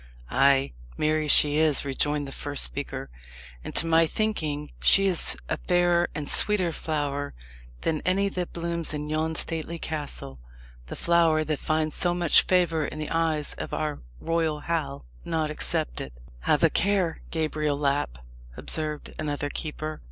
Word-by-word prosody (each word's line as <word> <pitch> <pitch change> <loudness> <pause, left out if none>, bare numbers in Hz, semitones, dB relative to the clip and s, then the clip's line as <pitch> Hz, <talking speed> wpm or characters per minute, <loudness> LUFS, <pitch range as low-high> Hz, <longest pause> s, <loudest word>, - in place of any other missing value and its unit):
"Ay, 135 - +3 0.2
marry 155 0 +1
is - - +5
she," 150 +1 +6 0.3
rejoined 145 +1 -1
the - - -7
first 145 +1 +1
speaker; - - -3 0.5
"and, - - -7
to - - +4
my 165 0 +4
thinking, 155 -9 -2
she 195 - +6
is 185 -3 +3
a - - -1
fairer 175 -1 +3
and 150 -3 -4
sweeter 185 -2 +1
flower 145 -3 -3 0.5
than 155 -2 0
any 195 +2 +1
that 180 -3 -3
blooms 170 -2 -3
in 150 0 -4
yon 160 +1 -1
stately 165 +1 -1
castle 145 - -5 0.5
the - - -6
flower 165 -2 +3
that 155 -1 -2
finds 155 0 0
so 175 -1 0
much 175 -3 +4
favour 170 -4 +2
in - - -7
the 155 -1 -4
eyes 160 -3 0
of - - -4
our 155 -1 -2 0.2
royal 165 -2 -1
Hal 145 - -3 0.2
not 160 -2 -1
excepted." 65 - -1 0.3
"Have - - +1
a - - +5
care, 190 -3 +1
Gabriel 155 -2 -1
Lapp," 140 - 0 0.4
observed 155 -1 -4
another 145 -1 -2
keeper. 155 0 -4
155 Hz, 150 wpm, -26 LUFS, 145-170 Hz, 0.5 s, she